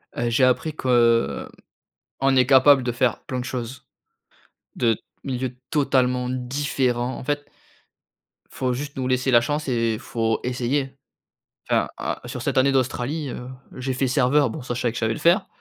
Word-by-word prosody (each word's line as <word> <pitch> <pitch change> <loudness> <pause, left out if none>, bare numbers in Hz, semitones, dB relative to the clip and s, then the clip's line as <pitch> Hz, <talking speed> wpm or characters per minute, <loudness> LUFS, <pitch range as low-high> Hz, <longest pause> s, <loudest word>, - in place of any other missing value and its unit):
Heu, 120 0 -1
j'ai 125 +3 +2
appris 130 +5 +2
que, 130 - -5
heu, 115 - +3 0.7
on 135 0 +3
est 130 -1 +5
capables 135 0 +6
de 120 - -1
faire 120 -1 +1
plein 130 -1 -4
de 125 - -4
choses, 125 0 -6 0.9
de 115 -3 +2 0.3
milieux 130 -2 -3
totalement 125 -4 +1
différents 130 -1 -1
en - - -8
fait 145 0 -2 1.0
faut 125 -1 -1
juste 140 +2 -6
nous 130 -1 -1
laisser 130 +1 +1
la 120 - +6
chance 145 +5 -2
et 115 -3 0
faut 115 -1 -1
essayer. 130 +2 -1 0.8
Enfin, - - +2
heu, - - -2
sur - - -5
cette - - 0
année 135 +1 +4
d'Australie, 135 +3 -1
heu, 125 +1 -7 0.3
j'ai 130 +1 -2
fait 130 +1 0
serveur- 135 +1 +3
bon, 135 +4 -6
ça 120 -1 -4
je 125 - -4
savais 120 -2 +1
que - - -10
je - - -2
savais 110 -1 +1
le - - -6
faire- 180 +4 +4
130 Hz, 180 wpm, -23 LUFS, 120-135 Hz, 1.0 s, capables